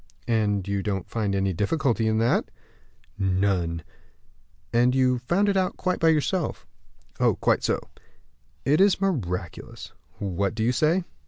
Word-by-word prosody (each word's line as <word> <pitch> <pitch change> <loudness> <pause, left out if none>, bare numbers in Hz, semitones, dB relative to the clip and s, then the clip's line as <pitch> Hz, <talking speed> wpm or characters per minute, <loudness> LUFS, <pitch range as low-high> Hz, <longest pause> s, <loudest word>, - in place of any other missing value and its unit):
"And 105 -4 +1
you 100 0 -1
don't 95 -3 -3
find 105 -4 -1
any 95 -1 0
difficulty 115 - 0
in 110 0 +1
that?" 115 +2 +1 0.7
"None." 95 -4 0 0.9
"And 120 +2 +3
you 130 -1 +3
found 175 +12 +1
it 200 - +2
out 185 -1 0
quite 185 0 -1
by 165 - +3
yourself?" 160 +2 0 0.7
"Quite - - +2
so." - - +1 0.9
"It 150 +6 +3
is 195 -2 +4
miraculous." 95 - -3 0.2
"What 100 +1 -2
do 110 - -1
you 120 - +3
say?" 155 +8 +2
115 Hz, 140 wpm, -25 LUFS, 100-155 Hz, 0.9 s, is